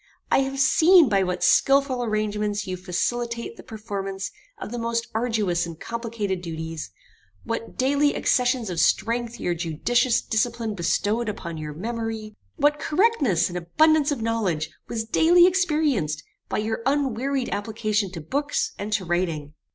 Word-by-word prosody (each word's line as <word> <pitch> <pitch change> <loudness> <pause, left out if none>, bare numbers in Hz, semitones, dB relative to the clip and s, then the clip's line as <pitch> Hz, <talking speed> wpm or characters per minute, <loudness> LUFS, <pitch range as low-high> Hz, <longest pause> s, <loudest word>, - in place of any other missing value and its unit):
I - - +5
have 270 0 -2
seen 320 +3 +6
by 195 -2 +3
what 180 -1 -1
skilful 275 -2 +3
arrangements 210 -2 -1
you 185 - -3
facilitate 235 +6 -2
the - - -11
performance 200 -3 -5 0.3
of - - -7
the 240 - -4
most 230 0 -1
arduous 215 -7 0
and 165 -1 -9
complicated 230 -5 -3
duties; 160 - -5 0.5
what 230 0 -5
daily 285 +3 +2
accessions 245 -4 +1
of 170 - -3
strength 235 +5 +1
your 175 - 0
judicious 210 - +1
discipline 225 -1 -1
bestowed 210 +5 0
upon 170 -6 -6
your 150 -1 -5
memory; 225 +2 -4 0.2
what 295 0 +2
correctness 300 - +2
and 180 0 -4
abundance 310 - +3
of 255 -6 -2
knowledge 200 -9 -1 0.2
was 225 -1 -3
daily 340 +9 +5
experienced 300 - +1 0.3
by - - -1
your 220 +1 -2
unwearied 270 -1 0
application 210 -1 -1
to 165 - -6
books, 285 - -1
and 205 +1 -4
to 200 -3 0
writing. 165 -4 -2
225 Hz, 145 wpm, -24 LUFS, 185-260 Hz, 0.5 s, seen